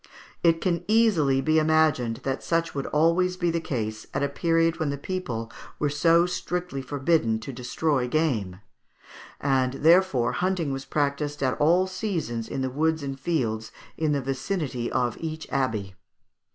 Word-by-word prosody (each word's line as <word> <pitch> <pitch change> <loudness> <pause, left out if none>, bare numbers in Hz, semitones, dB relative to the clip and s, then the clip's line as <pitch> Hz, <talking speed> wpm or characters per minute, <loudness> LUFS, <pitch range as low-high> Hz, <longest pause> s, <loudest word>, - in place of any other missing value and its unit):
It 165 -1 +3
can 175 -3 0
easily 195 -12 +3
be 155 +2 +3
imagined 155 -7 +2
that 135 0 -2
such 165 0 0
would 140 -1 -3
always 170 +4 +2
be 175 -2 +1
the 170 - 0
case 110 -7 -4
at 135 - 0
a 140 - +1
period 165 +2 +1
when 155 -2 0
the 140 - -2
people 125 -10 -4 0.3
were 145 -1 0
so 165 +4 +4
strictly 180 -4 -3
forbidden 135 -3 +1
to 135 +4 -7
destroy 125 +2 -1
game; 115 - -1 0.8
and 130 -2 +1
therefore 160 -4 +4
hunting 180 -6 -1
was 135 0 -5
practised 145 0 -1
at 130 +1 0
all 175 +5 +4
seasons 185 - -3
in 135 - -3
the 130 -1 -1
woods 160 +2 0
and 135 -1 -5
fields 115 -8 -1 0.2
in 155 -2 0
the 140 -1 +1
vicinity 135 -2 -3
of 120 -2 0
each 160 -1 -5
abbey. 110 -8 -1
145 Hz, 160 wpm, -26 LUFS, 130-165 Hz, 0.8 s, so